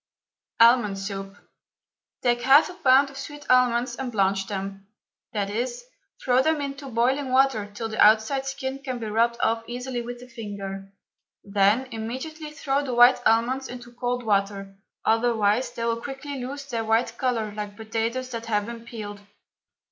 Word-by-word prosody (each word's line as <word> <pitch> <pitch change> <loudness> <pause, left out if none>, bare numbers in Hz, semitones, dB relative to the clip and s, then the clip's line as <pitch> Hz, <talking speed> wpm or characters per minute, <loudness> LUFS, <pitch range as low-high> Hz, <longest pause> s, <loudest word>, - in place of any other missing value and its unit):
ALMOND 230 -4 +5
SOUP. 195 0 -6 0.9
Take 240 -1 +2
half 270 +7 +6
a - - -10
pound 275 -5 +4
of 270 - -12
sweet 290 0 -8
almonds 250 0 +3
and 260 -2 -4
blanch 195 -2 +1
them, 195 -1 -5 0.5
i.e., 210 +4 -1 0.6
throw 250 0 +4
them 315 +2 +1
into 280 -1 -5
boiling 260 +4 +1
water 260 -6 +3
till 225 +2 -4
the 220 0 +2
outside 220 +6 +4
skin 270 0 -4
can 260 -3 -4
be 230 - -5
rubbed 230 +2 +1
off 225 0 +1
easily 245 +1 -4
with 240 +1 -7
the 250 - -12
finger. 200 -4 -7 0.5
Then 205 +5 +2
immediately 260 +8 -5
throw 285 -1 -1
the 255 -3 -3
white 245 +2 +7
almonds 240 +4 +2
into 245 -1 -9
cold 245 0 -2
water, 200 -2 -1 0.3
otherwise 225 0 +2
they 230 - -4
will 230 0 -1
quickly 270 0 -6
lose 280 +2 -6
their 230 -4 -2
white 225 +1 +1
colour 230 -5 -1
like 205 -1 -6
potatoes 230 +3 -2
that 230 -1 -5
have 210 -2 0
been 230 0 -8
peeled. 210 -3 -7
235 Hz, 160 wpm, -25 LUFS, 215-260 Hz, 0.9 s, white